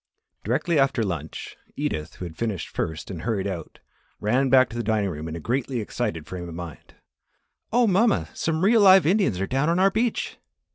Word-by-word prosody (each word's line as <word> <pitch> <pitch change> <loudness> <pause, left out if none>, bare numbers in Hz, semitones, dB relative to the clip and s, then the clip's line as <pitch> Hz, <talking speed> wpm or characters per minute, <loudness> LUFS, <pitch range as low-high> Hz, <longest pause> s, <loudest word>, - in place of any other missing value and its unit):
Directly 145 - +1
after 135 -4 +2
lunch, 85 -6 -5 0.2
Edith, 75 -1 -3
who 90 - -6
had 80 -2 -8
finished 110 -3 -3
first 80 +4 -4
and 85 -4 -6
hurried 105 -3 -1
out, 90 -5 -5 0.4
ran 125 +6 +1
back 130 0 +6
to - - -9
the 120 - -1
dining 105 -3 0
room 80 0 -6
in 80 - -5
a - - -5
greatly 125 - -2
excited 80 -7 -3
frame 90 -2 -7
of 80 - -8
mind. 85 -6 -9 0.8
"Oh, 240 +2 +4
mamma! 215 +2 +2
Some 160 +1 -1
real 225 +1 +5
live 190 -3 +7
Indians 180 - +2
are 95 - 0
down 135 +7 0
on 170 - +2
our 195 +1 +4
beach." 225 +3 -1
115 Hz, 195 wpm, -24 LUFS, -, 0.8 s, live